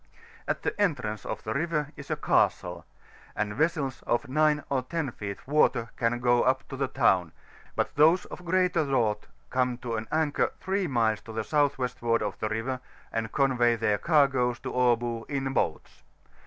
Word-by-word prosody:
At - - -2
the - - -1
entrance 125 - -1
of - - -4
the 110 - -2
river 150 0 -1
is 140 - -10
a - - +1
castle, - - +1 0.5
and 105 -1 -1
vesseb 145 -1 0
of 120 +4 +1
9 150 +2 +2
or 135 -2 0
10 145 +1 -3
feet 100 -1 -7
water 135 -5 +2
can 120 0 0
go 120 0 +3
up 130 +1 +1
to 135 - -5
the 135 0 -1
town; 95 - +2 0.4
but - - -1
those 160 +5 +5
of 180 - -9
greater 180 -1 +2
draught 115 -7 0 0.2
come 125 -1 +1
to 120 -1 -5
an 110 0 -5
anchor 155 -2 +1
3 190 0 0
miles 115 -6 +1
to 115 - -10
the 110 0 -2
south 145 +2 +2
westward 120 -2 0
of - - -4
the 110 - -1
river, 115 +4 -2 0.3
and 115 -1 -2
convey 125 -4 +3
their 105 -2 +1
cai^oes 135 -6 +2
to - - -4
Abo 120 -2 +1
in 135 -2 -2
boats. - - -2
130 Hz, 180 wpm, -28 LUFS, 115-150 Hz, 0.5 s, those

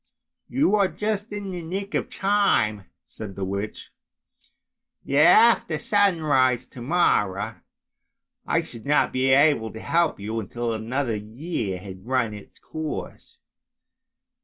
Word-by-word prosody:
" - - -61
You 275 -7 +3
are 200 -2 +3
just 210 +2 -3
in 205 -2 -5
the 180 -1 -5
nick 195 +5 -5
of - - -1
time," 195 - +1 0.2
said 105 -3 -9
the 95 - -3
witch, 100 +2 -5 0.6
" - - -37
after 175 +2 +5
sunrise 150 - +2
to 125 - -11
morrow 110 - +1 0.9
I - - +1
should 115 +1 -10
not 150 - +2
be 130 +1 +1
able 135 -5 +4
to 110 - -9
help 170 +2 +1
you 110 +3 -3
until 115 +3 -3
another 115 +2 -2
year 110 - -4
had 95 +2 -11
run 125 -4 0
its 105 -1 -12
course. 155 -1 -7
130 Hz, 135 wpm, -24 LUFS, 110-175 Hz, 0.9 s, after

